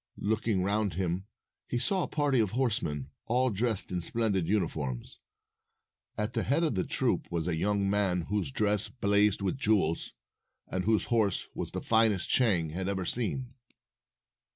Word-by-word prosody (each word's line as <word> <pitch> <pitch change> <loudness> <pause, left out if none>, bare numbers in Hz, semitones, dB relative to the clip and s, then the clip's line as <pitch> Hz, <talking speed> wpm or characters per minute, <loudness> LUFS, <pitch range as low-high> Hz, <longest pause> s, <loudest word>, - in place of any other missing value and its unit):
Looking 105 -2 0
round 100 -2 0
him, 95 +1 -2 0.4
he - - -1
saw 185 +10 +1
a - - -1
party 145 -4 +1
of 110 -3 +2
horsemen, 80 - -1 0.2
all 125 +2 +2
dressed 110 -1 -1
in 90 -1 -1
splendid 100 -2 0
uniforms. 80 - -2 1.0
At 105 +3 -2
the 115 - 0
head 145 +9 +1
of 155 - +1
the 95 -3 0
troop - - 0
was 85 -1 -2
a 85 - 0
young 100 +3 +1
man 95 -3 +1
whose 95 -2 -1
dress 105 +6 +1
blazed 105 -2 +2
with 100 +7 -1
jewels, 100 -9 +1 0.5
and 90 -1 -3
whose 110 0 +3
horse 105 -5 +1
was - - -3
the - - -5
finest 110 -5 +3
Chang 90 -11 +3
had 95 +3 -3
ever 95 -2 -2
seen. 125 +4 -1
105 Hz, 160 wpm, -30 LUFS, 90-115 Hz, 1.0 s, whose